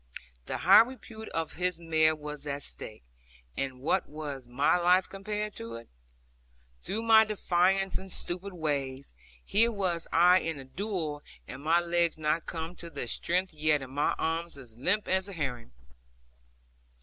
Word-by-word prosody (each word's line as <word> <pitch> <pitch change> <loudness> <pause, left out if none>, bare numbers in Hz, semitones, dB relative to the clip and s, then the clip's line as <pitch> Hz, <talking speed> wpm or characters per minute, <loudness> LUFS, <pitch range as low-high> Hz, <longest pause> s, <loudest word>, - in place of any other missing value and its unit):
The - - -2
high - - +8
repute 230 -2 -6
of 165 -1 -2
his 180 -1 -1
mare 160 -1 +3
was 150 -1 -7
at 140 0 -3
stake, 110 - -6 0.5
and 130 -2 -4
what 145 - 0
was 145 -4 -6
my 130 +7 +2
life 180 +2 +4
compared 210 +2 -4
to 115 0 -7
it? 115 0 -10 0.9
Through 215 - -3
my 220 -1 +7
defiance, 195 -2 +1
and 190 0 -10
stupid 185 +2 -4
ways, 140 - -3 0.3
here 230 +3 +3
was 185 -6 -1
I 180 +2 +6
in 165 -3 -3
a 135 - -9
duello, 160 -2 -3 0.3
and 130 - -8
my 165 +3 +3
legs 170 -1 +1
not 155 +1 0
come 165 +1 -4
to 170 - -9
their 140 -5 -4
strength 180 +9 -1
yet, 150 -2 +1
and 130 - -9
my 145 +2 +1
arms 165 -1 -2
as 120 -5 -12
limp 185 - +1
as 190 +1 +1
a - - -7
herring. 125 - -4
165 Hz, 160 wpm, -29 LUFS, 145-190 Hz, 0.9 s, high